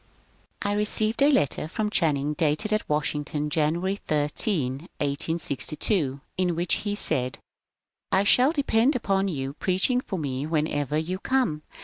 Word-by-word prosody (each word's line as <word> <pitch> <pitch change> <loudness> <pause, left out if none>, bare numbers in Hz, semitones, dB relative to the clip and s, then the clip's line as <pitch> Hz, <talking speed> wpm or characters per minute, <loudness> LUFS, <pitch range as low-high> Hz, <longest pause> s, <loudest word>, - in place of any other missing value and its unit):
I 205 - 0
received 215 +3 0
a 285 +2 +6
letter 150 - +1
from 210 +5 -2
Channing, 150 -6 +1
dated 155 +8 +1
at 215 - -1
Washington, 150 0 -1
January 170 +6 0
13, 150 - -1
1862, 145 - -1 0.2
in 180 -2 +1
which 170 +1 +1
he 205 -1 -2
said: 130 -10 0 0.4
— - - -56 0.3
I 190 - +4
shall 250 +7 +5
depend 275 -3 +2
upon 195 -5 +1
your 135 -6 -3
preaching 190 - +1
for 195 - -5
me 140 -2 -3
whenever 150 -2 0
you 175 +4 -2
come. 250 -14 0
165 Hz, 140 wpm, -26 LUFS, 150-205 Hz, 0.4 s, a